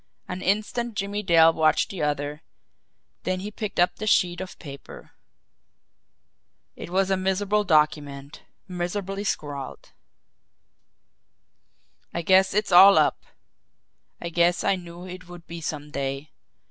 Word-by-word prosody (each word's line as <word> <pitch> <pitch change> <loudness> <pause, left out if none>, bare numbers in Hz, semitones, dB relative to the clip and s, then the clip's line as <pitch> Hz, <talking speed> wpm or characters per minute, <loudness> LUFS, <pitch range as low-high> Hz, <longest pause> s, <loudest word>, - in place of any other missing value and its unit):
An 180 +1 -5
instant 215 +4 -1
Jimmie 205 0 -3
Dale 165 -4 +5
watched 155 -1 +2
the 190 - -6
other, 145 0 -2 0.8
then 185 0 -2
he 205 +2 -6
picked 215 -3 -5
up 175 - +2
the 215 - -5
sheet 180 -3 +2
of 190 - -8
paper. 140 -4 -11 1.6
It - - -9
was 190 +2 +1
a - - +4
miserable 195 +3 0
document, 150 -4 0 0.3
miserably 190 +2 -4
scrawled: 145 -8 -5 2.2
"I 170 - -2
guess 190 +2 +4
it's 210 -1 0
all 195 +3 +9
up. - - +1 0.9
I 170 - -5
guess 170 +1 +2
I - - +2
knew 175 0 -10
it 180 -1 -10
would 175 -1 -11
be 170 0 -8
some 150 -2 -5
day. 140 +1 -4
180 Hz, 130 wpm, -25 LUFS, 155-195 Hz, 2.2 s, all